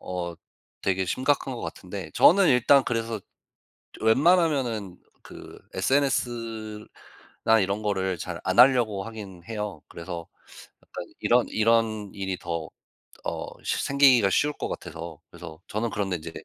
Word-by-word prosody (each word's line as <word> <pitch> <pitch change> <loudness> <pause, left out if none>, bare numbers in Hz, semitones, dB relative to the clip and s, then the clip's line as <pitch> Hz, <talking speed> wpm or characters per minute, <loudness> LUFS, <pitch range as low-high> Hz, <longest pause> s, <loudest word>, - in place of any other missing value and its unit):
어 90 -1 -4 0.5
되게 95 -1 0
심각한 130 +3 0
것 115 - -7
같은데 90 -3 -7
저는 195 +1 +6
일단 130 +2 +5
그래서 115 -2 -2 0.8
웬만하면은 130 - +2 0.2
그 - - -12
SNS나 115 -4 -1
이런 100 +3 -1
거를 95 -3 -1
잘 - - -6
안 - - 0
하려고 120 -6 +5
하기는 100 -6 -9
해요. 105 -2 -4
그래서 85 -1 -7 0.6
약간 - - -8 0.2
이런 120 +1 +3
이런 110 -2 +1
일이 95 -2 -3
더 85 -2 -4 0.6
어 - - -3 0.2
시 - - -1
생기기가 130 -7 +5
쉬울 150 0 +2
것 - - -4
같아서. 80 -1 -7
그래서 85 -2 -11
저는 110 +3 -2
그런데 95 -3 -1
이제 80 0 -8
110 Hz, 275 characters per minute, -26 LUFS, 95-125 Hz, 0.8 s, 저는